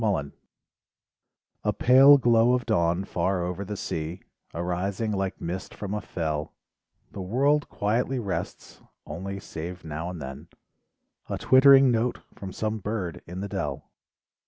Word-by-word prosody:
MORNING 85 -10 0 1.3
A - - +2
pale 135 +3 +7
glow 120 -1 +4
of 125 -1 0
dawn 85 -4 +1
far 90 +1 -1
over 90 +3 -3
the 105 +1 -6
sea, 80 +2 -4 0.3
Arising 90 +6 -2
like 95 -2 -2
mist 90 +3 -5
from 100 -1 -5
a 105 - -2
fell, 80 -4 -3 0.6
The 100 - -7
world 140 +10 +1
quietly 120 +6 0
rests; 100 -6 -5 0.2
only 95 +6 -6
save 90 +1 -7
now 80 +2 -4
and 90 -2 -7
then. 65 -2 -8 0.8
A - - -2
twittering 135 0 +7
note 120 +1 0 0.2
from 95 -1 -8
some 110 +3 -2
bird 100 -4 -4
in 90 +2 -6
the 100 - -3
dell. - - -4
95 Hz, 140 wpm, -26 LUFS, 85-115 Hz, 1.3 s, pale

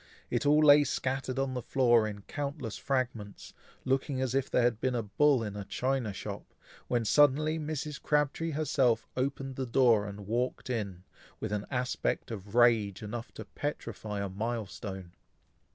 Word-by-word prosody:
It - - 0
all 150 +1 +5
lay 145 0 +8
scattered 130 -1 -2
on 135 -1 0
the 125 - -3
floor, 120 -3 +3
in 100 -2 -7
countless 140 -5 -4
fragments, 120 -6 -3 0.3
looking 135 +1 0
as 130 -1 -1
if 135 -1 0
there 125 - +2
had 120 -2 +1
been 130 -1 0
a 115 - -1
bull 130 +5 +3
in 105 -2 -5
a 105 - -4
china 125 +2 -1
shop, 95 - -7 0.3
when 120 -2 0
suddenly 150 +5 +4
Mrs. 150 -1 -4
Crabtree 150 +2 +1
herself 135 -6 +1
opened 135 0 -2
the 130 -1 -2
door 115 -4 +4
and 100 0 -8
walked 125 +4 -2
in, 100 -6 -3 0.4
with 110 - -4
an 105 -1 -2
aspect 125 -1 -1
of 100 0 -7
rage 115 -5 +4
enough 115 +3 -6
to - - -7
petrify 110 -7 -4
a 100 - -3
milestone. 100 -3 -5
125 Hz, 165 wpm, -30 LUFS, 105-135 Hz, 0.4 s, lay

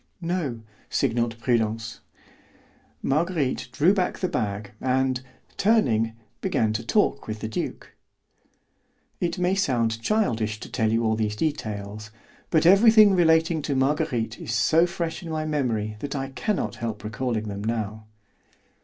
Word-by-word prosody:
"No," 165 -9 -2 0.3
signalled 120 -3 0
Prudence. 115 -1 -1 1.0
Marguerite 150 -3 0
drew 160 +9 +4
back 185 -3 0
the 185 - -1
bag, 100 - -3
and, 130 0 +1 0.4
turning, 120 - +2 0.3
began 110 -1 +1
to 110 - -2
talk 140 - +1
with 110 0 -4
the 110 - -4
duke. 110 - -5 1.3
It 170 +1 -1
may 180 +1 +1
sound 120 - 0
childish 115 - 0
to - - -9
tell 110 -3 +1
you 115 +1 +1
all 110 0 +2
these 105 -1 -1
details, 105 -7 -3 0.4
but 160 0 +3
everything 210 +2 +7
relating 160 -2 +3
to 140 -1 -2
Marguerite 130 -5 0
is 115 - -3
so 160 +9 +4
fresh 170 -2 -4
in 170 - -8
my 155 -1 -2
memory 115 -8 -1
that 145 +3 -4
I 135 -1 -3
can 210 +10 -1
not - - -3
help 115 -3 -4
recalling 110 +1 -2
them 100 0 -5
now. 110 -1 -3
130 Hz, 145 wpm, -25 LUFS, 110-165 Hz, 1.3 s, everything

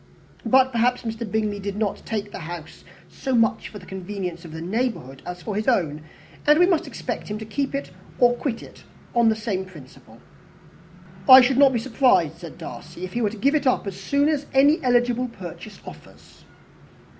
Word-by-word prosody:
But, 260 +2 +5
perhaps, 245 +1 +1
Mr. 225 -2 -5
Bingley 215 -2 -1
did 200 0 -4
not 210 -2 -2
take 210 -2 -3
the - - -7
house 165 -1 -8 0.2
so 265 -2 -3
much 230 -2 +1
for 210 - -10
the 185 - -12
convenience 185 -2 -6
of 165 - -10
the 160 - -7
neighbourhood 175 - -3
as 180 0 -7
for 210 - -4
his 215 +1 -2
own, 160 - +1 0.5
and 300 +1 +7
we 355 - +6
must 355 -4 +1
expect - - -5
him 210 - -4
to 220 - -7
keep 275 +6 -2 0.4
or 245 0 +5
quit 245 -1 -4
it - - -14 0.3
on 235 -1 +4
the 220 - +2
same 210 -4 -2
principle." 155 -9 -15 1.1
"I 260 0 +12
should 255 +1 +2
not 280 -2 +7
be 245 - 0
surprised," 255 +2 +2
said - - -10
Darcy, 175 - -9
"if 185 - -10
he 240 - -1
were 215 - +2
to 220 - -9
give 275 +8 +2
it 300 -3 +1
up 255 - +2
as 195 -2 -5
soon 280 +8 +2
as 295 -2 -1
any 285 +4 +5
eligible 245 0 +2
purchase 205 -1 -10
offers." - - -14
225 Hz, 195 wpm, -23 LUFS, 190-255 Hz, 1.1 s, I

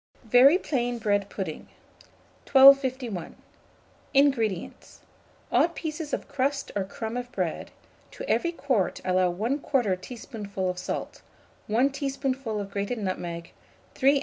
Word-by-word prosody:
VERY 250 +8 +7
PLAIN 245 -8 -1
BREAD 205 -3 0
PUDDING. 185 -6 -5 0.8
1251. 260 - +5 0.8
INGREDIENTS. 235 -10 +1 0.5
Odd 340 - +3
pieces 310 -1 -5
of - - -3
crust 275 +1 -1
or 200 -2 0
crumb 220 +4 -5
of 245 0 -5
bread; - - -3 0.4
to - - -8
every 340 - +1
quart 260 - 0
allow 185 -1 +2
1/2 225 -1 0
teaspoonful 205 -5 -5
of 180 - -8
salt, - - -5 0.5
1 245 +6 +2
teaspoonful 270 -5 -2
of 200 -1 -6
grated 200 +4 -2
nutmeg, 175 -4 -4 0.4
3 275 +2 +4
oz. - - +1
240 Hz, 120 wpm, -26 LUFS, 200-275 Hz, 0.8 s, VERY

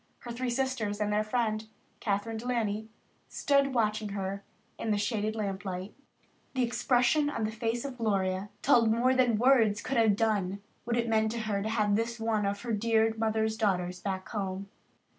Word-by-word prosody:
Her 240 - -7
three 250 +2 -2
sisters 240 -5 -1
and 210 0 0
their 210 +1 +2
friend, 215 -1 -1 0.3
Kathryn 210 +2 -1
De 235 +3 -6
Laney, 220 -3 -1 0.4
stood 280 -2 +2
watching 215 -2 +1
her 195 0 -3 0.4
in 225 - -3
the 210 - +2
shaded 215 +1 -1
lamp 200 -2 -3
light. 185 +1 -5 0.6
The 255 - +2
expression 250 +4 +2
on 290 - -3
the 215 - -1
face 230 +2 -2
of 260 -3 -6
Gloria 195 -3 0
told 235 -5 +5
more 240 +4 +3
than 250 -4 +3
words 225 -4 +4
could 270 - -1
have 220 -3 +4
done 200 -3 0 0.3
what 235 0 0
it 235 0 0
meant 220 -1 +2
to 235 - -3
her 210 -2 -1
to 215 - -2
have 210 -2 +2
this 230 +2 -1
one 220 -2 0
of 200 0 -2
her 235 -2 -2
dear 225 +1 +2
mother's 220 0 0
daughters 180 -4 0
back 190 -1 -3
in - - -25
the - - -14
home. 190 +1 -5
220 Hz, 195 wpm, -30 LUFS, 205-235 Hz, 0.6 s, told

